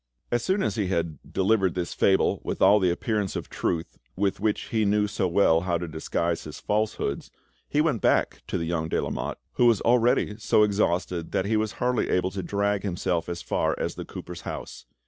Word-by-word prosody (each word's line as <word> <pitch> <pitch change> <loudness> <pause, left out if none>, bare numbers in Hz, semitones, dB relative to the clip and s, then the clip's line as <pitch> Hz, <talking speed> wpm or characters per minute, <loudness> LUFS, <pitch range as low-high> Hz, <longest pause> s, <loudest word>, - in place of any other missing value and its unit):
As 120 -1 +1
soon 190 +1 +1
as - - -1
he 100 -3 0
had 85 -5 -1
delivered 95 -1 +2
this 90 -1 -2
fable 95 -1 +2
with - - -3
all 100 +2 +6
the 95 -2 +2
appearance 100 +2 -1
of - - -5
truth 85 -1 -2 0.2
with 100 0 0
which 105 0 -1
he 110 -2 +1
knew 105 0 +2
so 100 -2 -1
well 85 -2 +4
how 90 -1 0
to 85 +1 -5
disguise 85 +1 -2
his 75 - -8
falsehoods, 105 -9 -1 0.4
he 150 - +2
went 150 -8 +1
back - - +2
to - - -1
the 85 - -2
young 80 -1 -2
de - - +1
Lamotte, - - -3 0.2
who 120 - +5
was 115 -4 +4
already 120 -3 +2
so 105 0 +4
exhausted 90 -4 0
that 95 - +1
he 110 +2 +1
was 110 0 0
hardly 125 -1 0
able 90 +1 +1
to 95 - -4
drag 100 +1 0
himself 90 -3 -1
as 85 -1 -5
far - - 0
as - - -2
the - - -6
cooper's - - -8
house. - - -7
100 Hz, 205 wpm, -26 LUFS, 85-110 Hz, 0.4 s, all